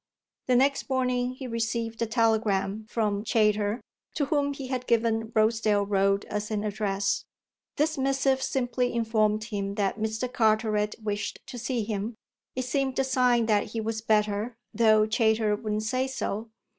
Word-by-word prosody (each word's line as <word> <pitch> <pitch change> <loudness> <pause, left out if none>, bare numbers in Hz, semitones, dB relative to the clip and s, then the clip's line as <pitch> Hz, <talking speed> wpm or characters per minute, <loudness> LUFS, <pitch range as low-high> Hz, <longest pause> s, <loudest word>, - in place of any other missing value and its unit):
The 250 - +3
next 275 +3 +2
morning 250 -1 0
he 260 - -7
received 230 -1 -2
a 230 - +1
telegram 215 -2 +1
from 210 -3 0
Chayter, 210 0 +1 0.3
to 290 - +1
whom 285 -1 +1
he 275 -1 -7
had 255 -1 -3
given 225 -1 +1
Rosedale 215 -2 +3
Road 195 0 +2
as 210 0 -4
an 210 -1 -1
address. 200 -2 -1 0.5
This 310 0 +1
missive 270 0 +1
simply 250 -2 0
informed 215 -2 +1
him 200 -3 -3
that 205 0 -1
Mr. 220 +3 -1
Carteret 215 -3 +1
wished 205 -1 -2
to 245 - -8
see 240 -1 -1
him; 210 +1 -3 0.4
it 255 0 -2
seemed 265 0 -1
a 270 - +3
sign 250 -3 +3
that 210 -1 +1
he 230 - -2
was 220 0 -2
better, 215 +1 +1 0.2
though 215 -1 +5
Chayter 220 -1 +2
wouldn't 215 0 -3
say 255 +4 0
so. 225 -4 -3
225 Hz, 155 wpm, -27 LUFS, 210-250 Hz, 0.5 s, though